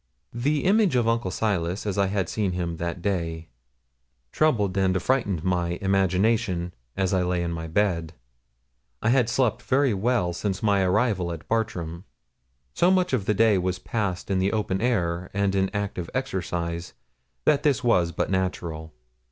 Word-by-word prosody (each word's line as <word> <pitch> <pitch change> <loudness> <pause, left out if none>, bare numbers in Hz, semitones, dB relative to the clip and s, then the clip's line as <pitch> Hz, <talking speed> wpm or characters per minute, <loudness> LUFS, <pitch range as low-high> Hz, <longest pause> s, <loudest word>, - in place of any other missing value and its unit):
The 145 +6 0
image 200 -4 +3
of 120 -2 +2
Uncle 115 -4 +1
Silas, 95 -2 -1
as 100 -3 -1
I 100 - +3
had 95 -2 -1
seen 100 -2 -1
him 85 -2 -3
that 85 +1 -4
day, 85 -4 -2 0.8
troubled 105 -12 +2
and 95 -1 +2
affrighted 100 - 0
my 90 -1 0
imagination, 95 -1 +1 0.2
as 95 -1 +1
I 95 - +2
lay 90 -1 0
in 85 - -2
my 80 0 -5
bed; 85 -2 0 0.9
I 115 - +3
had 125 -2 +3
slept 125 -1 +1
very 130 +3 +2
well 100 -3 +1
since 95 +3 -3
my 100 -2 +3
arrival 95 -1 +1
at 80 -2 -8
Bartram. 95 -6 -2 0.7
So 175 - +3
much 185 -4 +2
of 110 -7 +1
the 105 - +1
day 110 -2 +4
was 90 0 -1
passed 100 -1 -3
in 95 - +2
the 95 +3 +1
open 105 -3 -1
air, 90 -7 0
and 100 -1 +1
in 95 -1 +1
active 100 -4 -3
exercise, 85 -7 -3 0.5
that 145 -2 +4
this 145 -3 +1
was 90 -8 +3
but - - -2
natural. 85 -5 -3
95 Hz, 165 wpm, -25 LUFS, 90-115 Hz, 0.9 s, day